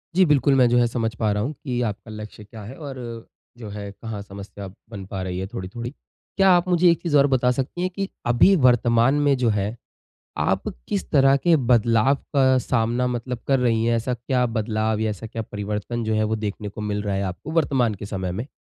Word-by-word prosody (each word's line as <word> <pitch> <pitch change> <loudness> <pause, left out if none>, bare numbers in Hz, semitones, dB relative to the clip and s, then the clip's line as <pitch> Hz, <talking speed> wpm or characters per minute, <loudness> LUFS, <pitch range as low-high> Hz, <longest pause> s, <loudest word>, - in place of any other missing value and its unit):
जी 190 - +6
बिल्कुल, 145 -3 +3
मैं 125 -2 +5
जो 120 - +3
है 120 - +4
समझ 115 -1 -2
पा 110 -2 0
रहा 105 +1 0
हूँ 145 +5 -3
कि 125 -3 -4
आपका 105 +2 -9
लक्ष्य 105 0 -9
क्या 110 +1 -11
है 110 +6 -9
और 140 -4 -8 0.6
जो 110 -3 -8
है 100 0 -6
कहाँ 105 0 -7
समस्या 100 0 -9 0.2
बन 100 -4 -8
पा 95 0 -5
रही 90 0 -4
है 95 - -3
थोड़ी-थोड़ी। 115 +3 -6 0.5
क्या 195 0 +5
आप 175 +1 +3
मुझे 175 0 +4
एक 170 - -1
चीज़ 155 -4 +2
और 140 +1 +5
बता 125 -2 +2
सकती 135 +7 -3
हैं 185 - 0
कि 195 -1 -2 0.2
अभी 120 +11 +5
वर्तमान 120 +1 +4
में 140 -1 +4
जो 120 -2 +2
है 105 +1 -1 0.6
आप - - 0 0.2
किस 100 -3 -2
तरह 135 -1 +5
के 165 +4 +3
बदलाव 115 +3 +4 0.2
का 130 -1 +5
सामना 120 +1 0
मतलब 125 0 -3
कर 135 -1 +4
रही 115 -2 +2
हैं, 115 0 +2
ऐसा 125 +2 -1
क्या 125 +1 0
बदलाव 110 -1 -1
या 110 -1 0
ऐसा 105 +2 -6
क्या 115 0 -5
परिवर्तन 105 +3 -4
जो 110 0 0
है 110 0 +2
वो 110 +1 0
देखने 105 0 -5
को 105 - -9
मिल 105 -1 -2
रहा 100 -2 -2
है 95 - -1
आपको 95 - -6
वर्तमान 135 -8 +2
के 100 +1 -8
समय 95 -3 -3
में? 110 +8 -4
115 Hz, 225 wpm, -23 LUFS, 105-130 Hz, 0.6 s, जी